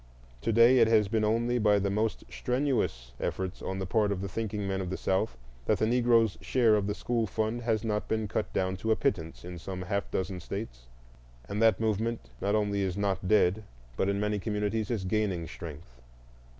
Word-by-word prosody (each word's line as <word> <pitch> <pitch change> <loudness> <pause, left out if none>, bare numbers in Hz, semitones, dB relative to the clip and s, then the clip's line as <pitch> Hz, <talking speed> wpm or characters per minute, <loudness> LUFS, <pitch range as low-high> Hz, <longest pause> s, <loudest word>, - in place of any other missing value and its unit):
To - - 0
day 115 +3 +6
it 115 - +6
has 110 -2 +4
been 110 +1 0
only 120 +3 +1
by 105 -2 +4
the 100 0 0
most 110 +2 -1
strenuous 65 - -1
efforts 95 0 -3
on 95 - -3
the 95 - -3
part 105 +2 +1
of 100 - -1
the 100 - -3
thinking 105 0 -3
men 95 0 -1
of 90 - -4
the 95 - -3
South 95 - 0 0.3
that 110 - +3
the - - +1
Negro's 115 -5 +3
share 120 -4 +3
of 100 -1 0
the 105 - -1
school 115 -1 -1
fund 110 +4 -1
has 115 -3 0
not 105 -2 -1
been 110 -1 -1
cut 105 +1 -2
down 95 0 -1
to 110 - -3
a 110 - +5
pittance 85 - -2
in 90 -1 -7
some 90 +2 -5
half 100 +2 -2
dozen 95 0 -2
States; 85 - -6 0.6
and 105 - -3
that 110 -1 +5
movement 110 - -1
not 100 +2 +1
only 100 -1 +1
is 95 -1 -1
not 100 -2 -1
dead, 105 0 +3 0.3
but 95 - +1
in 100 0 0
many 105 0 0
communities 105 +1 -1
is 110 -6 -2
gaining 95 -4 0
strength. 75 -6 -10
105 Hz, 205 wpm, -29 LUFS, 95-110 Hz, 0.6 s, day